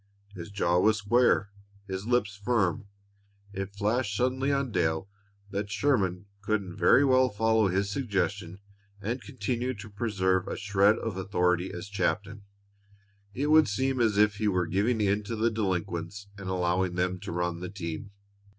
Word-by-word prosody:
His 90 -2 -8
jaw 90 -3 +1
was 110 +3 +3
square; 105 -1 +2 0.4
his 95 +2 -5
lips 120 -5 +1
firm. 100 -3 0 0.7
It 95 0 -5
flashed 105 +1 0
suddenly 130 +3 +1
on 140 -3 0
Dale 80 -2 0 0.4
that 100 +1 -3
Sherman 100 -8 0 0.2
couldn't 100 -3 -2
very 140 - +5
well 130 -1 +4
follow 110 0 +2
his 100 +2 0
suggestion 100 -6 -2 0.4
and 115 +6 -3
continue 130 -1 -3
to 105 +1 -10
preserve 95 -4 0
a - - -4
shred 100 +2 +3
of 110 -5 -4
authority 90 -1 0
as 90 +2 -7
captain. 100 +1 -2 0.9
It 145 +4 0
would 155 0 +6
seem 130 +5 0
as 110 -3 +2
if 105 -1 +4
he 110 - 0
were 90 -3 +1
giving 105 +6 0
in 100 0 +2
to 115 - -3
the 115 +1 +1
delinquents 95 -1 -3
and 100 -2 -7
allowing 90 0 0
them 90 +1 -1
to - - -6
run 85 0 -2
the 90 0 -5
team. 90 0 -6
100 Hz, 160 wpm, -28 LUFS, 95-115 Hz, 0.9 s, would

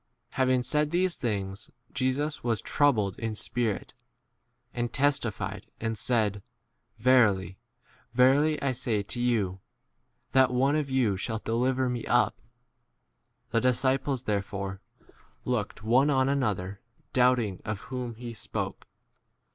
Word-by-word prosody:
21 - - -17
Having 130 -1 +2
said 150 +4 +1
these 175 +2 +1
things, 100 -5 -3 0.2
Jesus 130 +4 -1
was 115 -3 +1
troubled 110 -10 +1
in 115 -2 -2
spirit, 115 -1 -2 0.8
and 120 -1 -2
testi 140 -4 +1
fied 100 0 -6
and 115 0 -2
said, 105 -2 0 0.6
Verily, 105 -7 +3 0.5
verily, 140 +5 +4
I 140 - +2
say 120 -4 -1
to 120 +4 -5
you, 105 -7 +1 0.7
that 130 -1 +5
one 135 +4 +2
of 150 -2 -1
you 125 -7 +2
shall 110 +3 -2
de 110 - -5
22 - - +1
liver 130 0 +1
me 125 -2 -3
up. - - +2 1.1
The 115 0 +2
disciples 130 +1 +1
there 105 -4 +1
fore 95 -1 -6 0.6
looked 115 -5 -2
one 125 +6 +4
on 130 -2 +3
another, 105 -8 -1 0.3
doubt 125 0 +5
23 120 -3 -1
ing - - -22
of 105 -1 -3
whom 125 -2 -5
he 120 +1 -7
spoke. - - -5
120 Hz, 140 wpm, -28 LUFS, 105-130 Hz, 1.1 s, that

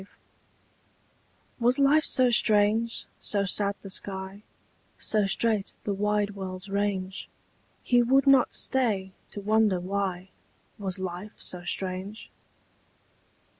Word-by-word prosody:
V. 190 - -13 1.5
Was 245 +2 +3
life 285 +3 +4
so 255 -1 +4
strange, 220 +1 +2
so 200 -1 0
sad 200 +1 +2
the 195 - -8
sky, 190 +1 -5 0.6
So 210 -2 0
strait 215 0 0
the 205 - -2
wide 210 +1 0
world's 190 -1 -7
range, 195 -1 -2 0.5
He 245 -1 +3
would 265 +3 +3
not 270 -3 +5
stay 215 -8 -1 0.2
to - - -7
wonder 210 -2 +2
why 190 0 -3 0.5
Was 190 -3 -2
life 185 +2 -6
so 180 -1 -1
strange? 190 +4 -4
205 Hz, 115 wpm, -27 LUFS, 190-225 Hz, 1.5 s, not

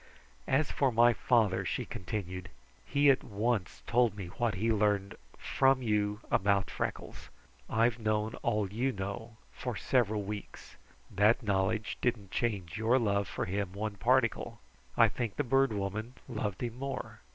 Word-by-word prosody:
"As 140 +3 +2
for 135 -2 +2
my 120 +1 +5
father," 110 -5 +2
she - - -2
continued, 90 -1 -5 0.4
"he 140 0 +5
at 130 - 0
once 105 -2 -2
told 120 -3 +2
me 95 -4 -6
what 115 +3 -1
he 110 +4 +1
learned 100 -2 +1 0.2
from 135 -1 +2
you 105 -1 0
about 100 0 +2
Freckles. - - -5 0.4
I've 115 +1 +2
known 110 0 0
all 105 -2 0
you 125 +5 +1
know 110 +3 -6 0.2
for - - -4
several 110 -5 +1
weeks. 105 +1 -8 0.4
That 105 +6 +3
knowledge 105 +2 0
didn't 105 -6 -1
change 100 -7 -2
your 115 +3 +3
love 100 -4 +1
for - - -3
him 95 0 -3
a 110 0 0
particle. 100 - +1 0.4
I - - +7
think 115 -5 -3
the 145 - 0
Bird 135 0 +3
Woman 110 +4 -3
loved 105 -5 -3
him 120 0 -4
more. 135 0 -5
110 Hz, 150 wpm, -31 LUFS, 100-120 Hz, 0.4 s, I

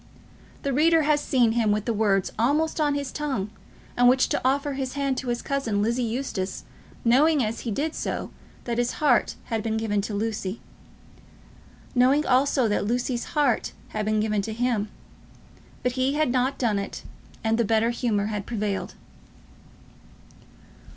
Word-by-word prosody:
The 280 -2 0
reader 320 +3 +4
has 295 0 +2
seen 245 -6 +3
him 225 -2 +2
with 210 0 0
the 230 - 0
words 200 -3 +1
almost 305 +7 +1
on 290 -1 +2
his 280 -2 -3
tongue 265 -10 -3 0.4
with 245 0 +5
which 255 +1 +4
to - - 0
offer 280 +2 +1
his 265 -1 -3
hand 275 -2 0
to 260 - -7
his 240 0 -2
cousin, 230 -8 0
Lizzie 235 +3 0
Eustace, 230 -5 -3 0.4
knowing 280 +4 +4
as 220 +1 -2
he 235 - -4
did 295 +9 -1
so - - -4 0.3
that 235 -1 -2
his 245 0 0
heart 280 -6 +2
had 225 -2 -2
been 220 0 -1
given 210 -2 0
to 205 +1 -4
Lucy, 210 -1 -2 1.3
knowing 265 +4 +4
also 260 -1 +3
that 205 -1 0
Lucy's 245 +1 -1
heart 280 -6 +2 0.2
had 215 - -3
been 215 0 +1
given 215 -1 +1
to 220 +2 -4
him! 230 -3 0 0.9
But 250 - +1
he 260 +2 0
had 305 -4 +2
not 255 +2 +1
done 220 -5 +1
it, 200 - -6 0.4
and 225 +1 +1
the - - +4
better 225 +2 +2
humour 225 -4 0
had 210 -2 -4
prevailed. 210 -4 -3
240 Hz, 165 wpm, -25 LUFS, 215-275 Hz, 1.3 s, with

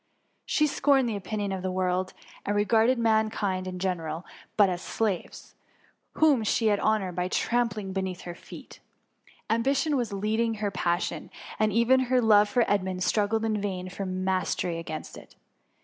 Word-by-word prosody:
She 305 - +2
scorned 275 -3 +2
the 225 - -2
opinion 200 +1 -3
of 190 -1 -3
the 185 - -2
world, 185 0 -1 0.3
and 205 - -1
regarded 225 +4 +3
man 220 -2 +2
kind 190 -4 -2
in 180 0 -5
general 175 -3 -3 0.3
but 205 -2 +6
as 180 -1 -3
slaves, 210 -6 -3 0.6
whom 290 -7 +3
she 225 +2 +1
should 205 -2 +3
honour 215 -4 +1
by 180 +1 -2
trampling 215 -2 -1
beneath 190 -2 -3
her 175 - -7
feet. - - -12 0.7
Am«> 230 +1 +1
bition 280 +4 +1
was 240 -5 0
her 200 - -5
leading 220 +3 0 0.2
passion, 175 -1 -1 0.3
and 215 0 +2
even 235 +5 +4
her 255 -1 +4
love 210 -3 +5
for 245 +1 +2
Edmund 185 -2 0
struggled 220 +3 +1
in 215 -2 0
vain 185 -2 -3
for 195 +1 -5
mas 185 0 -1
tery 170 -2 -2
against 155 -2 -7
it. - - -18
205 Hz, 170 wpm, -27 LUFS, 185-225 Hz, 0.7 s, but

